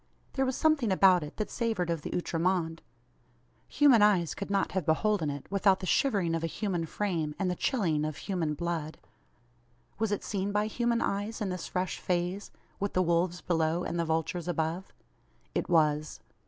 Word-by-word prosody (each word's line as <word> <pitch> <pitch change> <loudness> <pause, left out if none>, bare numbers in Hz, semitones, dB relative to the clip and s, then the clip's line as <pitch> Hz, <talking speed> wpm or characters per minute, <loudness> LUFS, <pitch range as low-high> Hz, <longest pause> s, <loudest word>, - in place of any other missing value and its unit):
There 265 -1 +1
was 260 - -1
some 315 0 +4
thing 240 -8 -2
about 185 -1 +5
it 150 0 -8
that 215 - -3
savoured 220 -8 -1
of 165 -2 -2
the - - -6
outre 170 -1 -2
monde. 165 -2 0 0.9
Human 275 -7 +5
eyes 190 -6 +4
could 200 - -6
not 200 -1 +1
have 190 -2 -1
beholden 165 +1 +1
it, 140 -1 -5
without 195 -1 +3
the 185 - -5
shivering 190 -5 +2
of 165 0 -1
a - - +1
human 175 -2 -2
frame, 165 -6 -2
and 190 -2 0
the - - -2
chilling 165 - 0
of 155 -1 -3
human 170 -6 -2
blood. 165 -1 -3 1.0
Was 220 -1 0
it 205 - -1
seen 200 -1 -2
by 210 +1 +1
human 235 +1 0
eyes 205 +4 -2
in 210 -3 -2
this 180 -1 -4
fresh 185 0 -2
phase 180 +2 -2 0.3
with 200 0 -2
the 185 - +3
wolves 175 +1 +1
below, 165 0 0
and 170 - -3
the 170 - +1
vultures 160 +2 -1
above? 170 +2 -2 0.6
It - - -2
was. 155 -3 +2
180 Hz, 190 wpm, -29 LUFS, 165-205 Hz, 1.0 s, about